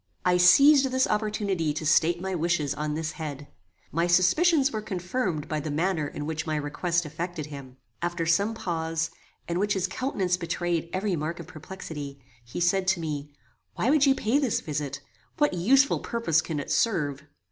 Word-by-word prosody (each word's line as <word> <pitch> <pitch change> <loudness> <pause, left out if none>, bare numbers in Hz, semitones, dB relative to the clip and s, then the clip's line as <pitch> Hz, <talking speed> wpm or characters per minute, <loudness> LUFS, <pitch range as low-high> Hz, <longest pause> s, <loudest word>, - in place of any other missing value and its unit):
I 180 0 +4
seized 270 +10 +7
this 260 0 +2
opportunity 200 -7 -1
to 155 - -4
state 160 +3 +3
my 190 +1 -3
wishes 165 -4 0
on 150 0 -3
this 160 0 -2
head. 145 -3 -6 0.4
My 170 +2 +1
suspicions 275 - +4
were 215 - -3
confirmed 180 - -2
by 155 - -2
the 155 - -4
manner 160 0 0
in 145 - -6
which 155 0 -3
my 155 - 0
request 155 +4 -1
affected 165 +1 -5
him. 140 -3 -10 0.2
After 175 -1 -1
some 200 +7 +2
pause, 165 -5 -2 0.4
in 170 +1 -1
which 205 +1 +1
his 190 -1 +1
countenance 190 -4 -1
betrayed 170 -1 -2
every 190 0 -1
mark 160 +2 -3
of 170 - -7
perplexity, 150 -4 -8 0.2
he 120 +7 -7
said 185 +2 +2
to 190 -2 +3
me, 150 -3 -4 0.4
"Why 250 - +1
would 295 -2 +4
you 270 - +5
pay 245 +5 +1
this 265 -7 +1
visit? 150 -2 -4 0.4
What 295 -7 +2
useful 265 +11 +3
purpose 195 -10 +1
can 160 -2 -4
it 145 - -5
serve?" 150 - +1
175 Hz, 180 wpm, -27 LUFS, 155-200 Hz, 0.4 s, seized